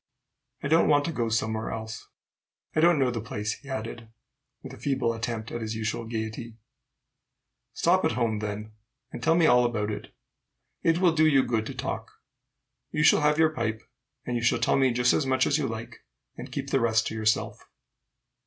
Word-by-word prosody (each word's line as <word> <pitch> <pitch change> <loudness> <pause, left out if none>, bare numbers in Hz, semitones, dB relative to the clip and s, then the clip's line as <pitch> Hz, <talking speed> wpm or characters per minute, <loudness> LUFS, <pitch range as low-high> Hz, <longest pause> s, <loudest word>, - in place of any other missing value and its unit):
"I - - -1
don't 160 +3 +4
want 145 -1 +4
to 170 - -2
go 120 -7 -1
somewhere 110 0 -1
else. 110 0 -6 0.7
I - - +2
don't 170 0 +5
know 130 -3 +2
the 115 -2 -3
place," 105 -1 -3
he 140 - -14
added, 115 -2 -5 0.5
with - - -9
a - - -10
feeble 135 -4 0
attempt 115 -1 -4
at 120 - -4
his 110 0 -4
usual 110 +1 -3
gayety. 110 0 -5 1.2
"Stop - - +2
at - - +1
home, 115 -3 0
then, 105 0 -5 0.4
and - - -7
tell 165 0 +3
me 170 -1 +4
all 125 -4 +5
about 110 -3 -1
it. 105 - -7 0.7
It 165 0 +2
will 175 -2 +3
do 155 -1 +4
you 135 -3 +4
good 110 -2 -1
to 135 - -7
talk. 115 -3 -4 0.8
You 150 - 0
shall - - +6
have 150 0 +3
your 160 -1 +4
pipe, 110 -5 -3 0.4
and 125 - -2
you 120 - -1
shall 120 - +3
tell - - +2
me 135 -2 +3
just 125 +1 +3
as 135 - +1
much 130 0 +2
as 150 - +1
you 140 - 0
like, 110 0 -7 0.4
and - - -9
keep - - -4
the 135 - +3
rest 115 -1 +2
to - - -7
yourself." 110 -1 -1
120 Hz, 200 wpm, -27 LUFS, 110-140 Hz, 1.2 s, shall